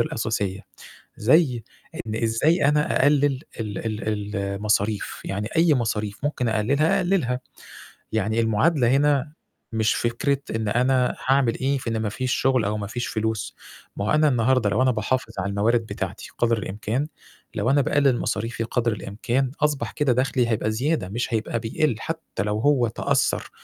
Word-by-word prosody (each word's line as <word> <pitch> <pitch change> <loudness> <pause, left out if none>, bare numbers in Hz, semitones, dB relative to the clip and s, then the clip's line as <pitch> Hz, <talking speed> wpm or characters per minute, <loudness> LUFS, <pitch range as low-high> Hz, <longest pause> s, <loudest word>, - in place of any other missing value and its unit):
الأساسية، 110 - -1 0.6
زي 125 0 +3 0.4
إن 110 - -3
إزاي 140 +8 +2
أنا 150 -1 +2
أقلِل 145 -1 +3 0.2
ال 105 -3 -4
ال 105 -1 -3
المصاريف، 100 +1 -1
يعني 100 +2 -3
أي 165 -1 +5
مصاريف 105 -4 -2
ممكن 145 -4 -1
أقلِلها، 140 - +2
أقلِلها. 175 -10 +1 0.7
يعني 110 +1 +1
المعادلة 115 +4 +2
هنا 145 +1 +2 0.4
مش 110 0 +2
فكرة 120 +4 0 0.2
إن 110 -1 -2
أنا 125 +3 +2
هاعمل 130 -3 +2
إيه 135 +1 0
في 120 - -4
إن 115 - -1
ما 105 - 0
فيش 130 +4 -1
شُغل 130 -3 +2
أو 105 +1 -1
ما 105 -1 -4
فيش 120 +4 -4
فلوس، 110 -2 -2 0.4
ما 100 - -2
هو 110 - 0
أنا 155 0 +4
النهارده 125 -3 +2
لو 130 - +2
أنا 130 - +4
باحافظ 115 +1 -1
على 100 +1 -1
الموارد 110 +3 +1
بتاعتي - - -5
قدر 115 -1 +2
الإمكان، 105 +8 -2 0.5
لو 125 - 0
أنا 145 - +4
باقلِل 140 -2 +2
مصاريفي 115 +2 -2
قدر 115 0 0
الإمكان 115 +6 -2
أصبح 150 -2 0
كده 145 -4 +1
دَخلي 125 -1 +1
هيبقى 110 -1 0
زيادة 125 - -1
مش 115 +3 -3
هيبقى 110 +1 -1
بيقِل 120 +5 0
حتى 160 - -4
لو 105 +1 -1
هو 125 -1 +3
تأثّر - - 0
120 Hz, 160 wpm, -24 LUFS, 110-135 Hz, 0.7 s, أي